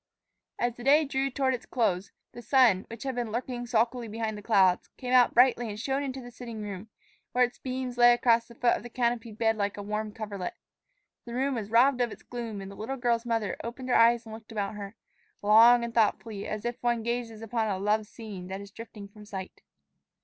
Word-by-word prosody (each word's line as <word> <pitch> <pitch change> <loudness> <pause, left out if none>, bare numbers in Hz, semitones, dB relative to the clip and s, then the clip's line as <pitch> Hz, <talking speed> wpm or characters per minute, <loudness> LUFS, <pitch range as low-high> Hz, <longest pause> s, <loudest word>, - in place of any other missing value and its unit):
As 240 0 0
the 240 - -11
day 295 +4 +5
drew 270 0 -1
toward 265 0 0
its 250 - -6
close 200 -6 0 0.2
the 240 - -10
sun, 235 -6 +4
which 230 0 -8
had 265 -1 -2
been 240 -3 -3
lurking 245 +1 -4
sulkily 235 +1 +1
behind 220 0 -3
the 210 - -8
clouds, 195 -4 +3
came 250 -1 -3
out 250 -1 +5
brightly 245 -1 +4
and 210 0 -6
shone 270 +3 -1
into 265 -2 -4
the 245 0 -10
sitting 230 -3 -7
room, 200 +1 -7 0.4
where 250 - +4
its 245 - -2
beams 255 -1 -4
lay 240 0 +8
across 235 -1 +3
the 235 - -14
foot 240 0 +3
of - - -6
the 240 - -9
canopied 235 -2 -1
bed 225 -1 +2
like 205 0 -1
a 205 - -5
warm 210 +1 -3
coverlet. 205 -4 -5 0.7
The 235 0 -7
room 270 +2 0
was 220 -4 -4
robbed 250 +3 +4
of 240 -2 +1
its - - -11
gloom, 230 -4 -6
and 195 0 -8
the - - -10
little 250 +7 -4
girl's 240 -1 0
mother 225 -4 -1
opened 250 +2 -6
her - - +3
eyes 235 +1 +5
and 220 - -9
looked 225 0 -11
about 205 -2 -2
her, 205 0 -8 0.5
long 230 +3 +7
and 235 -1 -4
thoughtfully, 220 -2 0
as 215 +1 -5 0.2
one 240 -2 0
gazes 235 -2 -3
upon 225 0 -1
a 195 -3 -1
loved 210 +2 0
scene 205 -6 -9
that 190 +1 -5
is 200 0 -10
drifting 215 -1 -10
from 210 +1 -15
sight. 195 -3 -8
230 Hz, 220 wpm, -28 LUFS, 210-245 Hz, 0.7 s, lay